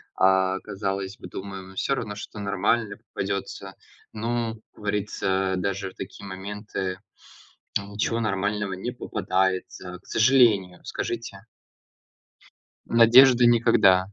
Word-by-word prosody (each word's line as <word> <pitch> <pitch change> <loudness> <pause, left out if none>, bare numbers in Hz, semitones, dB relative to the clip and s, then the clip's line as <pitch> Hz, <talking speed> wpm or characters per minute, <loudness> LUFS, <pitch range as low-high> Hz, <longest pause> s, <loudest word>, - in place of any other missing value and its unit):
а, 95 0 +3
казалось 100 -1 -4
бы, - - -10
думаем 95 0 -8
всё 135 +8 0
равно, 105 -5 -4
что-то 105 +1 -8
нормально 100 +2 0
попадется, 100 -3 -5 0.4
но, 115 +1 -2 0.2
как - - -43
говорится, 95 -2 -1
даже 100 0 -2
такие 95 +1 -9
моменты 95 -1 -5 0.8
ничего 100 +3 -2
нормального 105 -1 -1
не 95 +6 -4
попадается, 95 -4 -2
к - - -26
сожалению, 110 -7 +3
скажите? 115 -4 -4 1.5
Надежды 120 +2 +7
никогда. 105 -5 +4
100 Hz, 100 wpm, -25 LUFS, 95-110 Hz, 1.5 s, Надежды